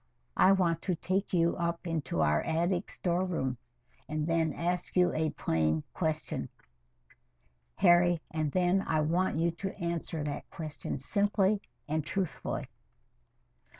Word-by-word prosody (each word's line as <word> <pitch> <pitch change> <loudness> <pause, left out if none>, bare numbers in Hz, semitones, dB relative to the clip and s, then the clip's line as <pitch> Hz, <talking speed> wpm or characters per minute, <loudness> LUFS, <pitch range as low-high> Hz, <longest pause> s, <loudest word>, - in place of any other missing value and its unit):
"I 190 - +6
want 175 -4 +2
to 185 - 0
take 190 +4 -1
you 170 -2 +3
up 170 0 -2
into 160 - -1
our 75 0 +3
attic 175 +3 0
storeroom, 170 -8 -1 0.5
and 155 0 -1
then 165 -1 +1
ask 175 +1 -2
you 180 -1 +4
a 155 0 +1
plain 80 - 0
question, 155 -2 -2 1.3
Harry, 175 0 +5
and 155 -2 -1
then 185 +3 +3
I 155 -1 +2
want 170 +3 +1
you 170 +1 +2
to 190 +4 -5
answer 170 -3 -3
that 145 -1 -4
question 155 -3 -5
simply 200 +6 +1 0.3
and 155 +1 0
truthfully." 190 +2 -3
170 Hz, 130 wpm, -31 LUFS, 155-180 Hz, 1.3 s, I